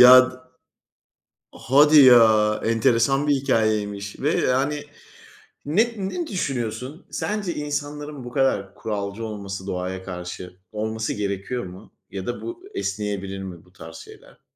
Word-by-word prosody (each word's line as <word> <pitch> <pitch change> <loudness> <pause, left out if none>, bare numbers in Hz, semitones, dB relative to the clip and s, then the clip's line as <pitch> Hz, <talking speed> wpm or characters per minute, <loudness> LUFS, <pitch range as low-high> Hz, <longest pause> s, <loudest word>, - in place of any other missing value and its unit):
Ya, 125 +1 +11
d - - -12 1.2
Hadi 150 +4 +5
ya 110 -4 +6
enteresan 115 +5 +2
bir 145 - +4
hikâyeymiş 105 -6 0
ve 145 - +1
yani 140 +3 +1 0.8
ne 220 +11 +2
ne 345 - -3
düşünüyorsun? 130 - -4
Sence 205 -4 -2
insanların 145 -1 -4
bu 120 - -7
kadar 105 -8 +1
kuralcı 105 0 -4
olması, 100 -3 -6
doğaya 95 0 -4
karşı, 90 0 -7 0.2
olması 110 +1 -2
gerekiyor 100 +4 -3
mu 90 +1 -12 0.2
ya 95 -1 -6
da 120 - -4
bu 350 +1 -7
esneyebilir 100 -1 -3
mi 90 -3 -8
bu 90 - -24
tarz 80 -3 -11
şeyler? - - -14
110 Hz, 130 wpm, -23 LUFS, 100-140 Hz, 1.2 s, Ya